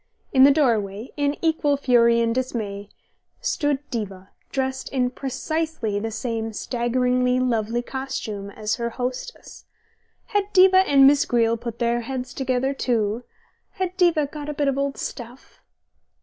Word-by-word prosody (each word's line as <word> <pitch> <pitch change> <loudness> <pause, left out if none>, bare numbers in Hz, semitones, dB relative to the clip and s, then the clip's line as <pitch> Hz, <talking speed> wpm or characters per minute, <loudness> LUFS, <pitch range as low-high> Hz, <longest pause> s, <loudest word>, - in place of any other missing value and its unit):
In 265 -1 +7
the - - +8
doorway, 225 -6 +1
in 290 0 0
equal 315 -3 +2
fury 235 -3 +4
and 230 0 +1
dismay, 215 -6 -3 0.5
stood 290 -2 -1
Diva, 195 -5 -5 0.2
dressed 265 -1 -2
in 250 -2 0
precisely 275 -4 -2
the 225 +2 -3
same 225 -1 -3
staggeringly 250 +2 0
lovely 240 -1 0
costume 245 -7 -5
as 210 +1 -3
her 235 -1 -2
hostess. 250 - -6 0.6
Had 410 -1 0
Diva 375 0 +7
and 275 -1 +7
Miss 280 +1 +6
Greele 230 -1 +2
put 235 -1 -5
their 235 0 0
heads 250 +1 -5
together 265 0 0
too? 235 -3 -1 0.5
Had 370 -3 -3
Diva 345 -5 +3
got 295 +1 -7
a 300 - -4
bit 285 0 0
of 275 - +1
old 275 0 -2
stuff 240 +2 -8
250 Hz, 145 wpm, -23 LUFS, 230-280 Hz, 0.6 s, the